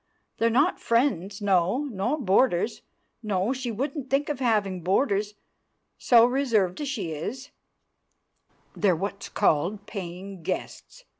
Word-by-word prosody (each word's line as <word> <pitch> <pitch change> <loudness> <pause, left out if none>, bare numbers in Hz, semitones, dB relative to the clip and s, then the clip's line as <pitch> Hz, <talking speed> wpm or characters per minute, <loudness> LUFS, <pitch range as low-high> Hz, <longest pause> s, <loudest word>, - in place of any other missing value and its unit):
They're 230 - +3
not 285 +10 +2
friends, 210 - 0
no, 195 +7 +2
nor 225 +8 -1
boarders, 215 -1 +2 0.4
no, 210 +1 0
she 260 -2 -4
wouldn't 270 +4 -4
think 280 +2 +1
of 295 -3 -2
having 210 -7 +1
boarders, 205 - +1 0.6
so 235 -2 +6
reserved 240 -6 +1
as 295 - -3
she 210 - -3
is; 235 - -6 1.2
they're 190 -4 +2
what's 200 +3 -5
called 190 +7 +1
paying 190 -1 -7
guests. 185 - -5
210 Hz, 125 wpm, -26 LUFS, 190-260 Hz, 1.2 s, so